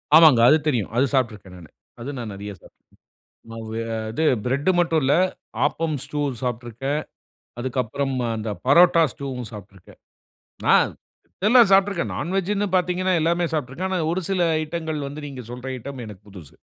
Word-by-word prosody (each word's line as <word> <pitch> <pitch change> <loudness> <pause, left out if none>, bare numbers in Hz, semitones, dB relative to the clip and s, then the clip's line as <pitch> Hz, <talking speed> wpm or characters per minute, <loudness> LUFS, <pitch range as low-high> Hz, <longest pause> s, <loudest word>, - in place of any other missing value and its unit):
ஆமாங்க. 155 -7 +8
அது 155 - +6
தெரியும். 120 -9 0
அது 135 - +4
சாப்ட்ருக்றேன் 105 -7 -2
நானு. 85 -4 -13 0.3
அது 130 - -5
நான் 115 -4 -5
நெறைய 100 +1 -7
சாப்பிட்ருக்கேன். - - -19 0.7
ம 115 - -8
வ 110 - -6 0.4
இது 160 +8 -1 0.2
பிரெட் 140 +7 0
மட்டும் 165 -2 +2
இல்ல 135 - +3 0.5
ஆப்பம் 155 0 -1
ஸ்டூ 150 -1 -3 0.2
சாப்ட்ருக்கேன். 125 +4 -3 0.6
அதுக்கப்புறம் 130 +2 -2 0.2
அந்த 110 0 -4 0.2
பரோட்டா 170 +4 +6
ஸ்டூவும் 125 -5 -6
சாப்ட்ருக்கேன். 100 -2 -13 0.7
ஆ - - +8 0.7
எல்லாம் 235 -2 +6
சாப்ட்ருக்கேன். 195 -2 +3
நான் 175 - -3
வெஜ்னு 200 +2 0
பார்த்தீங்கன்னா, 180 +1 +1
எல்லாமே 170 +2 +1
சாப்ட்ருக்கேன். 150 +5 -2
ஆனா 185 -2 -1
ஒரு 185 +2 -1
சில 180 -3 +2 0.2
ஐட்டங்கள் 155 -2 -4
வந்து 145 +2 -7
நீங்க 130 -3 -8
சொல்ற 125 +2 -7
ஐட்டம், 135 +1 -8
எனக்கு 105 -2 -11
புதுது. 90 -8 -13
140 Hz, 150 wpm, -23 LUFS, 120-170 Hz, 0.7 s, ஆமாங்க